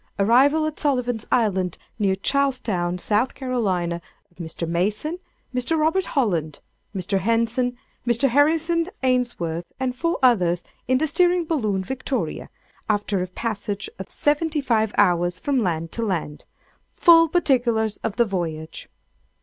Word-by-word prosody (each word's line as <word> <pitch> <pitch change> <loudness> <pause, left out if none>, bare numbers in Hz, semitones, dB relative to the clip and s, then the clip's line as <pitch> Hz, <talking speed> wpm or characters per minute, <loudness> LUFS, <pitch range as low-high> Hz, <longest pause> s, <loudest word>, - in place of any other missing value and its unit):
—Arrival 265 +9 +4
at 310 -1 -4
Sullivan's 250 -6 -1
Island, 190 -7 +1 0.2
near 195 -2 +2
Charlestown, 215 -7 0
S.C., 180 +4 -4
of 230 +5 +3 1.1
Mr. 165 0 -5
Mason, 210 - -1 0.3
Mr. 255 +6 0
Robert 325 +4 +2
Holland, 170 - 0 0.4
Mr. 195 +1 -1
Henson, 230 +3 0 0.3
Mr. 240 +3 +3
Harrison 325 +5 +2 0.2
Ainsworth, 240 -10 -1
and 255 -1 -1
four 335 +5 -1
others, 180 -9 +3 0.2
in 255 +1 +3
the 310 - +1
Steering 350 +2 +2
Balloon, 215 - -1
"Victoria," 265 +4 -3 0.4
after 205 -2 0
a 180 - -2
passage 205 0 -4
of 190 - -7
Seventy 300 +1 0
five 225 -6 +1
Hours 175 -2 +2
from 280 -2 0
Land 165 -6 -1
to 230 - -4
Land! 170 -8 -3 0.5
Full 330 -2 +6
Particulars 240 - +1
of 220 - -4
the 235 - +3
Voyage! 165 -6 -4
230 Hz, 130 wpm, -23 LUFS, 190-280 Hz, 1.1 s, Full